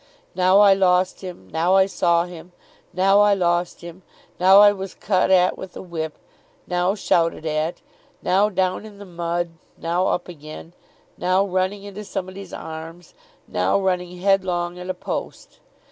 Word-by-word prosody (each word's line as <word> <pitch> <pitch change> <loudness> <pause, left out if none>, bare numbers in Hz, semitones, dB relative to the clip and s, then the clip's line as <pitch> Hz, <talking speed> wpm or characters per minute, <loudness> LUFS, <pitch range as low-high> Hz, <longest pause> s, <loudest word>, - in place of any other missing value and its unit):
Now 185 +2 +4
I 200 -1 +7
lost 185 -1 +2
him, 180 - -9
now 170 +4 +2
I 190 0 +6
saw 170 -3 +1
him, 175 0 -12 0.4
now 195 +2 +3
I 205 -1 +4
lost 175 -1 0
him, 170 +2 -10 0.4
now 190 +2 +7
I 205 0 +8
was 195 -1 -7
cut 185 -2 +1
at 185 -1 +3
with 190 -1 -9
a - - -7
whip, 160 -3 -5 0.5
now 180 +2 0
shouted 165 -5 0
at, 155 +2 -2 0.4
now 200 +3 +3
down 185 -1 -1
in 215 -2 -12
the 200 - -10
mud, 170 -1 -3 0.3
now 175 +3 0
up 175 - -1
again, 155 0 -10 0.5
now 185 +2 +2
running 190 +1 -1
into 205 +1 -8
somebody's 190 -1 -6
arms, 160 +1 -9 0.3
now 90 - +1
running 180 -2 -2
headlong 180 -2 0
at 180 +1 -8
a 185 - -2
post. - - -6
180 Hz, 160 wpm, -22 LUFS, 175-190 Hz, 0.5 s, I